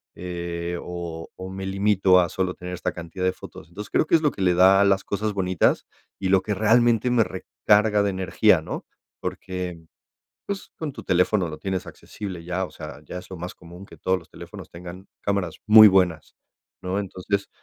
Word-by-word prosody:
eh, 85 -1 -4
o 85 -2 -6
o 95 0 -7
me 95 0 -6
limito 95 -1 +4
a 90 - +3
solo 95 +1 -2
tener 90 0 -7
esta 90 - -2
cantidad 85 +2 -7
de 95 - +3
fotos. 85 -2 -12
Entonces 100 +4 -8
creo - - +3
que - - +4
es 160 - +3
lo 150 -2 +2
que - - -8
le 90 -2 +3
da 95 +2 +6
las 95 -1 +3
cosas 105 +1 -1
bonitas 95 -2 +1 0.3
y 95 - -1
lo 95 -1 +4
que 105 - -2
realmente 115 +3 +3
me 120 -2 +4
recarga 105 +2 +1
de 100 - +1
energía, 95 -2 +3
¿no? - - -6 0.4
Porque, 90 -1 -5 0.7
pues, 200 -1 -5
con 155 -3 -4
tu - - -9
teléfono 90 +1 +2
lo 75 -1 -7
tienes 95 +1 -3
accesible 95 -5 -8
ya, 90 +2 -2
o - - -15
sea, - - -9
ya 90 - -7
es 90 - -11
lo 95 - -6
más 90 +1 -6
común 90 +2 -13
que - - -14
todos 95 0 0
los 85 - -17
teléfonos - - -11
tengan 90 +2 -10
cámaras 100 -4 -1
muy 110 0 +10
buenas, 90 -5 +1 0.5
¿no? 95 +2 -1
Entonces 100 +1 -3
95 Hz, 195 wpm, -24 LUFS, 90-100 Hz, 0.7 s, muy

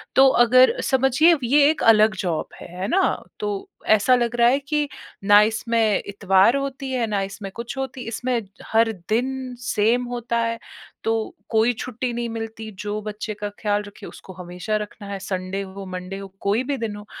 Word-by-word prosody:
तो 270 0 +7 0.2
अगर 255 +2 +6
समझिए 270 +6 +4
ये 285 +4 +5
एक 315 - -1
अलग 215 -2 +5
जॉब 170 -4 -1
है, - - -8
है 195 - -1
ना? 385 +1 +1 0.2
तो 425 -1 -2 0.5
ऐसा 215 +5 +4
लग 240 -1 0
रहा 235 - +5
है 270 - +2
कि 295 +1 -1 0.4
ना 205 +1 +8
इसमें 220 0 +1
इतवार 200 +3 +3
होती 275 -1 -4
है, 245 -3 0
ना 205 -2 -1
इसमें 195 0 -6
कुछ 235 +3 -6
होती 265 -1 -4
इसमें 245 +2 -1 0.3
हर 225 0 +4 0.2
दिन 255 +2 -1
सेम 245 0 +1
होता 235 0 -2
है, 230 0 -1 0.4
तो 225 -1 -1
कोई 225 +2 +3
छुट्टी 250 0 -3
नहीं 235 0 -2
मिलती। 225 -1 -6
जो 210 0 -3
बच्चे 215 +1 -5
का 205 0 -5
ख़्याल 210 -1 0
रखे, 205 - -12
उसको 190 - -12
हमेशा 180 +5 -3
रखना 205 0 -13
है, 200 -1 -5
संडे 190 0 -3
हो, 195 0 -8
मंडे 185 +1 -6
हो, 195 - -7
कोई 205 +5 +1
भी 280 +1 -2
दिन 225 -3 -4
हो। 210 - -10
225 Hz, 185 wpm, -23 LUFS, 205-250 Hz, 0.5 s, ना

